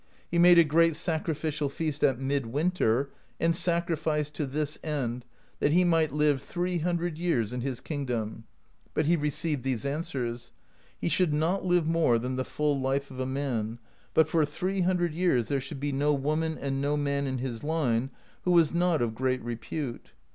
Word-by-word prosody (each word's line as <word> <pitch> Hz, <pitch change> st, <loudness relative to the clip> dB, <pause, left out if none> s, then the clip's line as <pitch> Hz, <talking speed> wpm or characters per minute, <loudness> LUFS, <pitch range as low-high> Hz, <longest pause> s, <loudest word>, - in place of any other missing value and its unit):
He 170 Hz, -, +2 dB
made 175 Hz, 0 st, +8 dB
a 170 Hz, -, +9 dB
great 165 Hz, +1 st, +3 dB
sacrificial 155 Hz, -3 st, -1 dB
feast 150 Hz, +1 st, -3 dB
at 130 Hz, -2 st, +3 dB
mid 135 Hz, -2 st, -1 dB
winter, 140 Hz, -2 st, +1 dB, 0.3 s
and 165 Hz, 0 st, +2 dB
sacrificed 160 Hz, -4 st, 0 dB
to 150 Hz, -1 st, -2 dB
this 150 Hz, +2 st, -2 dB
end, 125 Hz, -5 st, -2 dB, 0.3 s
that 145 Hz, -, +2 dB
he 180 Hz, +2 st, +5 dB
might 165 Hz, -3 st, +3 dB
live 150 Hz, -2 st, +2 dB
three 175 Hz, +4 st, -2 dB
hundred 170 Hz, -1 st, -1 dB
years 125 Hz, -11 st, 0 dB
in 125 Hz, -, -3 dB
his 130 Hz, -1 st, -3 dB
kingdom; 120 Hz, -7 st, -4 dB, 0.5 s
but 155 Hz, -, +2 dB
he 170 Hz, +3 st, +4 dB
received 150 Hz, -1 st, -1 dB
these 130 Hz, -3 st, -2 dB
answers: 130 Hz, -5 st, -3 dB, 0.5 s
he -, -, -2 dB
should 170 Hz, -3 st, +2 dB
not 170 Hz, +6 st, 0 dB
live 175 Hz, -2 st, +3 dB
more 160 Hz, -7 st, +3 dB
than 125 Hz, +3 st, -3 dB
the 130 Hz, -, -1 dB
full 150 Hz, +1 st, 0 dB
life 135 Hz, +1 st, -1 dB
of 130 Hz, -, -8 dB
a 130 Hz, -, -1 dB
man, 125 Hz, -5 st, -2 dB, 0.4 s
but 160 Hz, -1 st, +5 dB
for 160 Hz, 0 st, +2 dB
three 185 Hz, +6 st, -1 dB
hundred 175 Hz, -2 st, +1 dB
years 160 Hz, -9 st, +1 dB
there 140 Hz, -2 st, 0 dB
should 140 Hz, +1 st, -7 dB
be 145 Hz, +1 st, -1 dB
no 145 Hz, +2 st, +2 dB
woman 155 Hz, +3 st, -1 dB
and 135 Hz, -1 st, -2 dB
no 145 Hz, +1 st, +1 dB
man 140 Hz, -1 st, 0 dB
in 130 Hz, -1 st, -2 dB
his 125 Hz, -2 st, -4 dB
line 135 Hz, -6 st, 0 dB, 0.3 s
who -, -, -1 dB
was 170 Hz, -3 st, +4 dB
not 170 Hz, -5 st, +2 dB
of 115 Hz, -2 st, -1 dB
great 130 Hz, +1 st, -1 dB
repute. 120 Hz, +3 st, -5 dB
150 Hz, 185 wpm, -28 LUFS, 130-165 Hz, 0.5 s, a